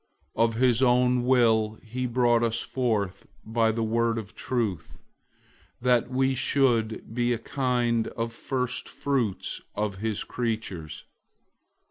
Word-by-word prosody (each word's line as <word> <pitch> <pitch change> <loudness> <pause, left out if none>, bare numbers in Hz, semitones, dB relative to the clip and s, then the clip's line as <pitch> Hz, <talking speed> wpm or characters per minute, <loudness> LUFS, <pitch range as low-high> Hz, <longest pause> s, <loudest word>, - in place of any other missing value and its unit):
001:018 115 - +3
Of 115 -1 +2
his 125 0 +3
own 125 -1 +3
will 110 -4 +3
he 125 +3 -3
brought 120 -1 +3
us 115 0 0
forth 105 -6 -2 0.2
by 115 0 +2
the 115 +1 -2
word 115 +1 +1
of 110 -1 -6
truth, 110 - -3 0.8
that 125 -1 +2
we 130 +1 +1
should 120 -5 +1
be 120 0 +1
a - - -1
kind 120 -2 0
of 115 0 -4
first 125 +1 -3
fruits 125 -9 -2
of 105 -2 -2
his 110 0 -2
creatures. 110 -10 -4
115 Hz, 130 wpm, -27 LUFS, 110-125 Hz, 0.8 s, 001:018